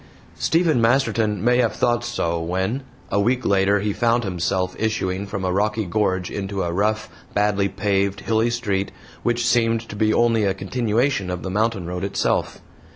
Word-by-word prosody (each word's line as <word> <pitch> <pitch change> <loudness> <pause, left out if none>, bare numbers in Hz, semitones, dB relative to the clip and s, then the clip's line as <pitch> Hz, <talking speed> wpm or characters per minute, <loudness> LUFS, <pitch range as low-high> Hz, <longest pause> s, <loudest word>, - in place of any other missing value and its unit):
Stephen 160 -6 +2
Masterton 115 -4 +2
may 125 0 +4
have 120 -3 +1
thought 120 -1 +1
it - - -4
so 85 0 -1
when, 95 +9 -1 0.3
a 100 - +2
week 125 +4 +1
later, 100 +1 +3
he 105 0 -1
found 120 +1 +2
himself 90 -1 -1
issuing 100 -3 -1
from 100 -2 -4
a 90 - 0
rocky 105 +2 0
gorge 95 -1 0
into 100 -1 -3
a 85 -1 -2
rough, 105 +3 0 0.3
badly 100 -1 +2
paved, 100 0 0
hilly 115 +1 +1
street, 100 -5 -1 0.3
which 120 0 0
seemed 115 -1 +2
to - - -8
be 110 +1 +2
only 115 -1 +3
a 95 -2 +1
continuation 115 +1 0
of 90 -1 -4
the 95 - -4
mountain 110 -2 0
road 90 +2 -4
itself. 100 - -1
105 Hz, 175 wpm, -22 LUFS, 95-115 Hz, 0.3 s, may